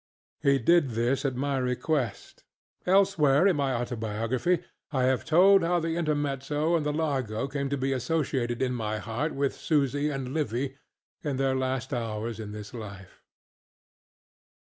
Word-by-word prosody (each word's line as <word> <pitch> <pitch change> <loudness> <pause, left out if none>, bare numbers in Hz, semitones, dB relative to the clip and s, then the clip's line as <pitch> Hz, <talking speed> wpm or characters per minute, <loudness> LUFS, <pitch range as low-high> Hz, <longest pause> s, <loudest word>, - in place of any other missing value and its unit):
He 140 0 +4
did 160 +3 +4
this 130 +5 +1
at 135 -2 0
my 140 +1 -1
request. 125 -2 -2 0.4
Elsewhere 180 -6 +4
in 195 -3 +4
my 135 -2 +1
Autobiography 120 +6 -1 0.3
I 130 -4 +1
have 130 0 +2
told 190 +4 +6
how 175 +1 +2
the 165 0 -2
Intermezzo 150 0 0
and 160 - +1
the 150 - 0
Largo 135 -7 -1
came 140 0 -3
to 140 - -1
be 135 +1 0
associated 130 -3 -1
in 125 -1 0
my 110 -3 -2
heart 115 +9 -3
with 140 0 0
Susy 145 -1 0
and 135 -3 -4
Livy 135 -2 -1 0.5
in 145 -3 -2
their 135 0 +1
last 130 +1 -2
hours 115 -1 -3
in 105 -2 -6
this 105 +1 -8
life. 100 -5 -9
135 Hz, 150 wpm, -28 LUFS, 120-150 Hz, 0.5 s, told